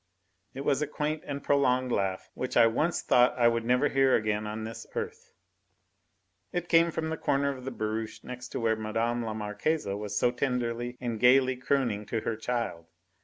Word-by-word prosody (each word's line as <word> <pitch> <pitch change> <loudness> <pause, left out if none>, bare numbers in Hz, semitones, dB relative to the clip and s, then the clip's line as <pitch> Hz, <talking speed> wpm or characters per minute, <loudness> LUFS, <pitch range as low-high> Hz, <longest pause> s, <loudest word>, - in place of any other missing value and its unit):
It 135 - -4
was 140 -1 +2
a 150 - 0
quaint 150 +1 -2
and 140 -1 -4
prolonged 130 -3 +2
laugh 95 -4 -1
which - - -3
I - - +8
once 150 +10 +1
thought 125 0 +4
I 120 -1 +5
would 115 -1 +1
never 125 +4 +3
hear 135 -1 +3
again 105 0 0
on 110 +1 -4
this 110 +1 -7
earth. - - -5 1.2
It 175 0 -2
came 165 0 +5
from 160 -1 -3
the 160 - -2
corner 140 -1 0
of 130 -1 -10
the 135 - -3
barouche 110 -1 -4
next 125 0 -7
to - - -2
where 115 -1 +2
Mme. 115 +2 -1
la 110 -1 -4
Marquise 110 +9 -1
was 105 +1 -3
so 120 - +3
tenderly 120 -1 -2
and 120 -3 -3
gaily 130 +2 +5
crooning 125 -5 -1
to 115 0 -2
her 110 - -2
child. 110 -7 -3
120 Hz, 190 wpm, -29 LUFS, 110-135 Hz, 1.2 s, I